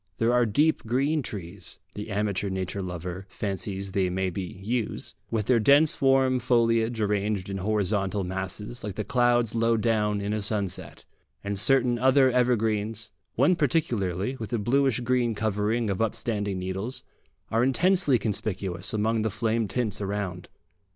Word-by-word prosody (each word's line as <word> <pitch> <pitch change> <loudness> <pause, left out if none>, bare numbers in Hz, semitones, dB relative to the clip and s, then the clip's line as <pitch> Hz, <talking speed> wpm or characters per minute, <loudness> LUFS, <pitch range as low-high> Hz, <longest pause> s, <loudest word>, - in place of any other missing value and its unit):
There 115 +1 +2
are 120 -1 +3
deep 150 +10 +2
green 140 +6 +1
trees 90 -6 -7 0.2
the 105 +1 -6
amateur 100 -1 -1
nature 95 +1 -3
lover 90 +1 -6
fancies 100 -1 -3
they 95 -1 +1
may 95 +1 -1
be 95 0 -6
yews 115 +1 -2 0.2
with 110 -3 -1
their 125 0 +4
dense 145 +7 +4
warm 135 -1 +4
foliage 115 -1 +2
arranged 105 -2 -1
in 100 - -3
horizontal 100 -1 0
masses, 95 +5 -5
like 105 -3 -5
the 105 - -2
clouds 120 0 +2
low 115 0 +2
down 105 -2 +1
in 100 +1 -2
a 105 - -1
sunset; 100 -3 -3 0.4
and 100 -1 -2
certain 125 0 +3
other 130 +1 +5
evergreens, 115 -3 0 0.2
one 145 +9 +4
particularly, 125 - 0
with 110 -1 -6
a 120 - +1
bluish 130 +3 +1
green 120 -2 +1
covering 110 +2 0
of 100 0 -1
upstanding 105 -3 -1
needles, 95 +7 -4 0.5
are 115 +2 +2
intensely 155 +1 +3
conspicuous 100 -2 -2
among 110 +1 +1
the 110 - 0
flame 110 +1 0
tints 105 -1 -2
around. 100 -3 -4
110 Hz, 150 wpm, -26 LUFS, 100-120 Hz, 0.5 s, other